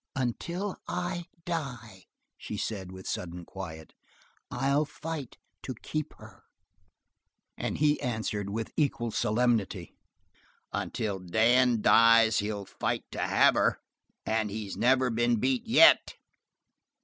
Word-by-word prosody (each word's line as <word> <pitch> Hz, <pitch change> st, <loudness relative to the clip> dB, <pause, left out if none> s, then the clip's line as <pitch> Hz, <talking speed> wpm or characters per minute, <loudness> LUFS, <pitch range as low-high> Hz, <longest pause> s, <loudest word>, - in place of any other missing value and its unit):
"Until 170 Hz, -, -3 dB
I 175 Hz, -1 st, -3 dB, 0.2 s
die," 120 Hz, -, -5 dB, 0.3 s
she 105 Hz, -, -7 dB
said 95 Hz, -4 st, -4 dB
with 95 Hz, 0 st, -10 dB
sudden 85 Hz, 0 st, -5 dB
quiet, 80 Hz, -5 st, -9 dB, 0.6 s
"I'll 140 Hz, +4 st, +1 dB
fight 150 Hz, -2 st, -7 dB, 0.2 s
to 130 Hz, -, -6 dB
keep 155 Hz, +6 st, -5 dB
her." -, -, -15 dB, 1.1 s
And -, -, -3 dB
he 150 Hz, 0 st, +2 dB
answered 110 Hz, -4 st, -2 dB
with 110 Hz, +2 st, -4 dB
equal 125 Hz, -6 st, 0 dB
solemnity: 110 Hz, -1 st, 0 dB, 0.8 s
"Until 100 Hz, -3 st, -3 dB
Dan 115 Hz, +6 st, +3 dB
dies 115 Hz, -1 st, +6 dB
he'll 105 Hz, -1 st, -3 dB
fight -, -, -3 dB
to -, -, -6 dB
have -, -, +4 dB
her. -, -, +1 dB, 0.5 s
And 110 Hz, -1 st, 0 dB
he's 105 Hz, -1 st, -5 dB
never 130 Hz, 0 st, +3 dB
been 120 Hz, +1 st, +2 dB
beat 130 Hz, -, 0 dB
yet." 245 Hz, +9 st, +6 dB
115 Hz, 115 wpm, -29 LUFS, 105-135 Hz, 1.1 s, dies